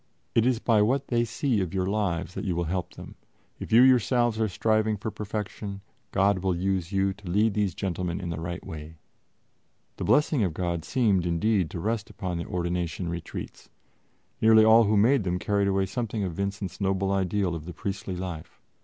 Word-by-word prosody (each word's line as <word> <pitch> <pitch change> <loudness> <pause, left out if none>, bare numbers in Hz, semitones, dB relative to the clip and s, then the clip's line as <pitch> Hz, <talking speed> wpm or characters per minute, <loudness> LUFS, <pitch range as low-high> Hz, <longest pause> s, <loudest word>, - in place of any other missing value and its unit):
It 115 +1 +3
is 130 -2 +2
by 110 -2 +3
what 130 +6 +1
they 120 -1 +2
see 115 -1 0
of 95 +1 -3
your 95 -1 +1
lives 95 -4 -1
that - - -5
you 90 -4 -1
will 85 - 0
help 90 +1 -3
them; - - -10 0.5
if - - -7
you 115 +3 +7
yourselves 120 -2 +3
are 110 - +2
striving 110 +2 +1
for 110 +2 -4
perfection, 105 -1 -5 0.3
God 100 0 +2
will 95 -1 0
use 95 0 -1
you 95 0 +1
to 100 -2 -11
lead 105 +4 +2
these 100 -4 0
gentlemen 90 -2 -2
in 90 -3 -4
the 80 -1 -4
right 85 +1 -5
way." 80 0 -8 1.0
The - - -4
blessing 150 -3 +3
of 85 -5 -1
God 85 -3 -2
seemed, 100 -4 +1
indeed, 90 +1 +1
to 85 - -6
rest 110 +3 -2
upon 90 -3 -4
the 85 - -4
ordination 85 0 -2
retreats; 85 -1 -7 0.7
nearly 110 0 +7
all 110 +1 +7
who 105 +1 +2
made 120 +4 +4
them 90 -1 -1
carried 100 +2 0
away 95 0 +1
something 110 +1 -3
of 90 -3 -3
Vincent's 100 +1 -4
noble 95 0 0
ideal 95 -1 0
of 80 -2 -6
the 90 - -6
priestly 95 +1 -4
life. 90 -3 -7
100 Hz, 195 wpm, -27 LUFS, 90-110 Hz, 1.0 s, you